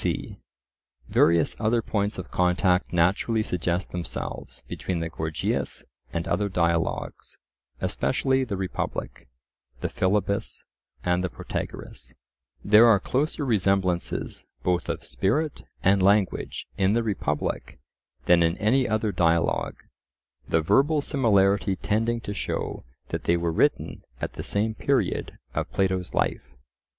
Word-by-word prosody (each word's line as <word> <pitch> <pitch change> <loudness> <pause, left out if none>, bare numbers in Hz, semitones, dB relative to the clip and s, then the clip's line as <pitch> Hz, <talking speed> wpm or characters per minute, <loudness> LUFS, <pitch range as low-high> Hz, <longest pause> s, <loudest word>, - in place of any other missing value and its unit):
c. - - -2 0.7
Various 85 -1 +3
other 115 +1 +2
points 105 -1 -1
of 95 - -7
contact 90 +1 +2
naturally 95 +6 +2
suggest 90 -1 -2
themselves 90 -1 -5
between 90 -3 -3
the 80 0 -2
Gorgias 80 -1 -2 0.3
and 85 +2 -3
other 105 -1 0
dialogues, 85 -2 -1 0.4
especially 130 0 +1
the 105 -6 -3
Republic, 95 -8 -4 0.5
the - - -1
Philebus, 100 +1 0 0.4
and 90 0 +1
the 90 - -1
Protagoras. - - -6 0.5
There 110 +3 +7
are 110 -4 +6
closer 145 - -1
resemblances 95 -6 0 0.2
both 90 -1 0
of - - -3
spirit 145 +10 0 0.2
and 95 +1 +4
language 100 0 +2
in 95 +1 +3
the 115 +1 +2
Republic 105 -4 -2 0.5
than 85 -1 +5
in 85 +1 +2
any 125 +5 +2
other 110 -1 +1
dialogue, 85 -2 +1 0.7
the 80 - +3
verbal 140 - +3
similarity 100 -8 +3
tending 115 +5 0
to 100 - -5
show 100 - -3 0.2
that - - -4
they 85 - +3
were 85 -1 0
written - - +1 0.2
at - - -4
the - - -6
same 110 +2 -1
period - - 0 0.2
of - - -2
Plato's 95 -2 0
life. 65 +1 -1
95 Hz, 125 wpm, -26 LUFS, 90-110 Hz, 0.7 s, There